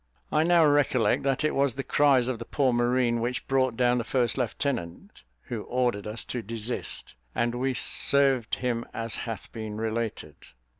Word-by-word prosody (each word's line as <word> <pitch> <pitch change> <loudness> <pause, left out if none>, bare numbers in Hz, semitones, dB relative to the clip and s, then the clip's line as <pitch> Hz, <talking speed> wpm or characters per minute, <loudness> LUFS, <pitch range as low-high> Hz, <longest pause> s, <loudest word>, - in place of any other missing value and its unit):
I 155 - +3
now 170 0 +5
recollect 140 -7 +3
that 135 +1 0
it 155 - +1
was 140 -3 +1
the 135 - -3
cries 135 -4 +3
of 125 -3 -2
the 115 - -6
poor 130 -1 +1
marine 120 0 +1
which 125 +2 -2
brought 130 -3 +1
down 125 -1 +3
the - - -2
first 120 -1 +1
lieutenant, 120 -7 -3 0.2
who 115 -3 -5
ordered 120 -4 -1
us 110 +1 -1
to 125 - -4
desist, 115 +2 -3 0.2
and 120 0 0
we 130 +1 -1
served 135 -1 +2
him 120 -2 -2
as 115 -1 -3
hath 115 -3 -5
been 110 -2 -6
related. 110 -8 -3
120 Hz, 170 wpm, -27 LUFS, 115-135 Hz, 0.2 s, now